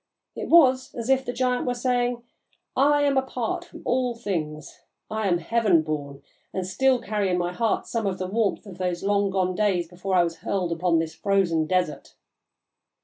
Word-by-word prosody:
It - - -5
was 260 -6 +5
as 235 +2 -1
if 265 0 +3
the 245 - -3
giant 250 0 0
were 245 - 0
saying, 245 -1 0 0.5
'I 290 +2 +4
am 280 -1 +2
apart 250 -3 -3
from - - -13
all 250 -1 0
things; 160 -9 -5 0.3
I 220 -1 -1
am 175 -2 +3
heaven 205 -4 +2
born, 145 -3 -5 0.3
and 190 -1 -3
still 255 +7 +2
carry 210 -4 -1
in 180 - +1
my 175 0 -1
heart 225 +1 0
some 225 -3 -2
of 190 -1 -2
the 185 - -3
warmth 210 +3 -1
of 190 -3 -11
those 180 -1 -2
long 200 0 +2
gone 185 -1 0
days 180 -3 +1
before 185 +2 -3
I 175 - +5
was 165 -1 -3
hurled 180 0 -2
upon 170 0 +1
this 160 0 -1
frozen 170 -3 +1
desert.' 180 -4 -1
200 Hz, 190 wpm, -25 LUFS, 175-245 Hz, 0.5 s, was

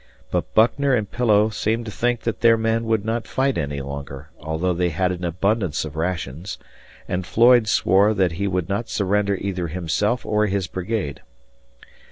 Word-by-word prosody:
But - - -1
Buckner 130 +5 +4
and 105 -4 -2
Pillow 110 -3 +3
seemed 110 +2 -1
to 110 - -6
think 120 +2 0
that 115 - -3
their 115 0 +6
men 115 +1 0
would 110 -2 0
not 115 +1 -2
fight 135 0 0
any 70 -1 -3
longer, 70 +1 -7
although 80 +4 -1
they 90 0 0
had 90 +3 0
an 90 0 -5
abundance 90 -1 0
of 75 -2 -8
rations, 80 0 -3 0.5
and 90 +1 -2
Floyd 120 +4 +5
swore 100 +1 +3
that 95 -4 +2
he 100 +5 -2
would 90 -3 -1
not 100 +4 -2
surrender 100 0 +1
either 95 -3 -3
himself 90 +8 -1
or 105 0 +1
his 100 -2 -1
brigade. 90 -5 -4
100 Hz, 175 wpm, -22 LUFS, 85-115 Hz, 0.5 s, their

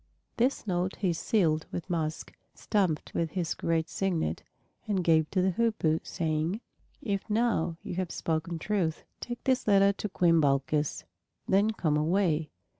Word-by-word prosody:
This 255 +2 +1
note 180 -1 -1
he 185 -5 0
sealed 165 -3 +1
with 175 - -5
musk, 160 -3 -3 0.2
stamped 185 -8 0
with 165 -2 -1
his 175 -3 -1
great 165 -1 0
signet, 170 - -1 0.5
and 195 -4 0
gave 160 -2 +3
to 185 -2 +1
the 190 - +3
Hoopoe, 180 -7 +1
saying, 160 +3 -1 0.4
"If 200 -1 -2
now 210 -7 +1
you - - -5
have 185 -2 -1
spoken 165 +1 -2
truth, 175 -3 -1 0.2
take 240 0 -6
this 260 -3 +1
letter 200 -1 +5
to 210 - -4
Queen 170 -3 +3
Balkis; 140 +1 +1 0.4
then 200 +3 +4
come 160 -9 0
away." 160 -1 +1
175 Hz, 150 wpm, -29 LUFS, 160-200 Hz, 0.5 s, letter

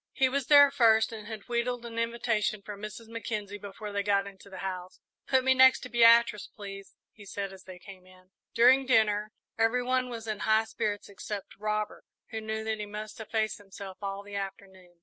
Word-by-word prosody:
He 265 - +3
was 275 -1 -2
there 285 -1 +8
first, 225 -4 +4
and 215 -2 -8
had 220 -2 -8
wheedled 240 0 -1
an 230 -1 -5
invitation 230 -3 -1
from 205 0 -8
Mrs. 215 +2 -8
Mackenzie 215 -3 -5
before 205 +1 -8
they 200 0 -1
got 200 -1 +1
into 200 0 -12
the 190 - -9
house. 185 -1 -6 0.3
"Put 260 -1 +3
me 260 0 +5
next 260 0 +6
to 250 - -8
Beatrice, 235 -2 +5
please," 195 -2 -10 0.2
he 210 - -15
said, 195 0 -5
as 190 - -14
they 185 -1 -10
came 185 0 -13
in. 185 0 -20 0.2
During 255 +3 +6
dinner 215 -4 +3 0.3
every 225 +2 +2
one 255 0 0
was 230 -2 -6
in 215 -2 -3
high 220 +1 +3
spirits 210 -2 -3
except 200 0 -7
Robert, 215 0 -2 0.3
who 220 - -4
knew 220 0 -3
that 220 -1 -2
he 210 - -4
must 210 +3 -7
efface 220 0 -1
himself 195 -1 -10
all 200 0 -4
the 205 0 -12
afternoon. 190 -2 -7
215 Hz, 200 wpm, -29 LUFS, 200-230 Hz, 0.3 s, there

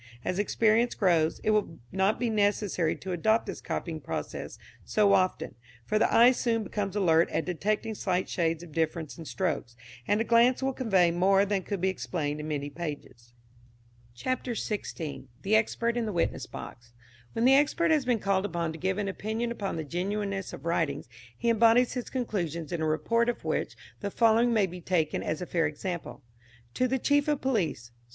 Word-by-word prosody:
As 185 - -1
experience 225 +3 +2
grows, 170 -5 +2
it 215 - +2
will 210 -6 0
not 190 +3 +1
be 240 -2 0
necessary 205 -5 +1
to 190 - -7
adopt 220 +6 +2
this - - -6
copying - - -4
process - - -5 0.3
so 205 -2 +3
often, 185 0 +1 0.3
for 215 - +1
the - - +3
eye 240 +2 +7
soon 230 -3 0
becomes 200 -2 -3
alert 170 -5 +3
at 160 - -1
detecting 210 +6 -1
slight 185 -3 -1
shades 165 -1 -1
of 170 - -12
difference 160 +1 -2
in 165 - -8
strokes, 150 -10 -2 0.3
and 205 - +2
a - - +2
glance 235 +3 +4
will 270 0 0
convey 195 -10 +3
more 195 +3 +3
than 200 -1 0
could 195 -1 -4
be 190 - +2
explained 150 -5 -3
in 150 - -5
many 145 -2 -2
pages. 140 -6 -7 0.8
CHAPTER 255 - -2
XVI. 170 - -4 0.2
THE 210 +3 +3
EXPERT 230 +2 +1
IN 235 -2 -1
THE 210 - -3
WITNESS 165 -6 -1
BOX. 120 0 -10 0.4
When 230 - +1
the 265 - +7
expert 295 +4 +3
has 305 -3 +3
been 245 -2 +1
called 195 -1 0
upon 170 -3 -2
to 160 - -9
give 190 +2 -1
an 205 -1 -1
opinion 220 +4 -3
upon 205 -4 -3
the 160 - -3
genuineness 195 +4 -3
of - - -10
writings 165 -6 -1 0.3
he - - -3
embodies 230 +2 +4
his 250 -2 -4
conclusions 175 - -3
in 170 -2 -2
a 160 - +1
report 230 +10 +1
of 240 - -4
which - - -1 0.2
the 200 - -3
following 230 +3 +3
may 215 -4 +3
be 180 -1 -8
taken 165 -3 0
as 155 +3 -3
a - - -4
fair 165 -3 +1
example: 170 +2 -5 0.5
To 255 - +1
the 265 +2 0
Chief 285 +3 +2
of 295 -2 +1
Police. 185 - -1
195 Hz, 190 wpm, -28 LUFS, 165-230 Hz, 0.8 s, eye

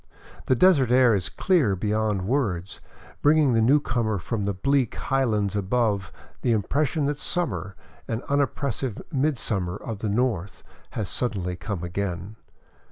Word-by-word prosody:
The 130 - +4
desert 140 -4 +5
air 125 -1 +5
is 90 -6 0
clear 140 - +2
beyond 105 0 0
words, 100 -9 -1 0.4
bringing 150 -3 +4
the 115 - +3
newcomer 120 -4 +2
from 105 +2 -3
the 100 - 0
bleak 135 +4 +1
high 135 0 0
lands 105 -4 0
above 100 - 0 0.3
the 120 - +2
impression 140 - 0
that 145 0 -1
summer, 145 - -2 0.3
an 115 +2 -3
unoppressive 140 -4 -1
midsummer 115 - -1
of 110 -2 -6
the 110 - -2
North, 105 -4 -1 0.3
has 105 -4 -1
suddenly 95 -8 -2
come 100 -2 -5
again. 90 +2 -4
110 Hz, 140 wpm, -25 LUFS, 100-135 Hz, 0.4 s, desert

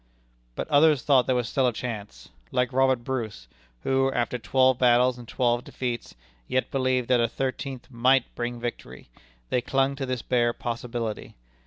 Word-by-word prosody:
But - - -4
others 150 -2 +4
thought 135 -4 +4
there 130 - +2
was 120 -2 0
still 130 0 +1
a - - +2
chance. 105 - -6 0.2
Like 125 - 0
Robert 130 -2 +2
Bruce, 115 - -4 0.4
who, 135 0 +2
after 120 0 -1
twelve 130 +2 +3
battles 125 0 +4
and 120 - -11
twelve 120 0 +1
defeats, 120 -2 -5 0.3
yet 130 - -1
believed 130 -2 +1
that 125 -2 +4
a 115 - +3
thirteenth 130 +1 -4
might 125 +2 +3
bring 120 0 -4
victory, 120 - -7 0.4
they 125 - +2
clung 135 +2 +1
to 135 -1 -3
this 125 -3 -3
bare 120 -2 +2
possibility. 115 -2 -4
125 Hz, 165 wpm, -26 LUFS, 120-130 Hz, 0.4 s, others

